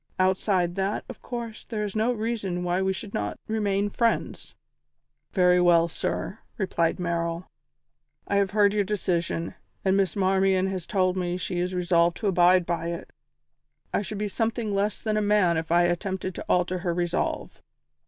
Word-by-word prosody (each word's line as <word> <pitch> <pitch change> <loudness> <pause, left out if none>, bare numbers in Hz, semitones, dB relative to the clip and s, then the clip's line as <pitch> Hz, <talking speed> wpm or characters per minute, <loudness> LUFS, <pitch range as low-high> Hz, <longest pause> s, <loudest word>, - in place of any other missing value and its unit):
Outside 185 -1 +2
that, 195 +2 -1
of 255 - -9
course, 235 -3 -6
there 215 -2 -3
is 205 -1 -4
no 220 +3 +2
reason 215 -6 -2
why 180 +1 0
we 190 0 +1
should 195 +2 -6
not 105 0 -2
remain 205 -2 0
friends." 230 +3 -1 0.8
"Very 180 -1 +4
well, 170 -1 +5
sir," 180 +4 -3 0.2
replied 170 -5 0
Merrill, 170 0 -2 0.8
"I 200 - +1
have 200 -1 +2
heard 205 0 +3
your 210 -1 +2
decision, 175 -4 -1 0.3
and 190 0 +3
Miss 195 -4 +1
Marmion 190 -1 +2
has 185 -3 -5
told 185 -2 +1
me 180 -1 -1
she 180 -1 -3
is 180 +1 -1
resolved 170 -1 +2
to 215 - -2
abide 180 -1 +4
by 170 -1 -2
it; 170 0 -5 0.8
I - - +2
should 205 +1 -5
be 210 +1 -1
something 225 +1 -1
less 200 +1 0
than 215 -1 -1
a - - +2
man 205 -4 +3
if 160 0 -3
I 175 +1 +5
attempted 185 +2 -1
to - - -7
alter 180 0 +2
her 175 -1 -1
resolve. 175 -1 -2
185 Hz, 175 wpm, -26 LUFS, 175-205 Hz, 0.8 s, well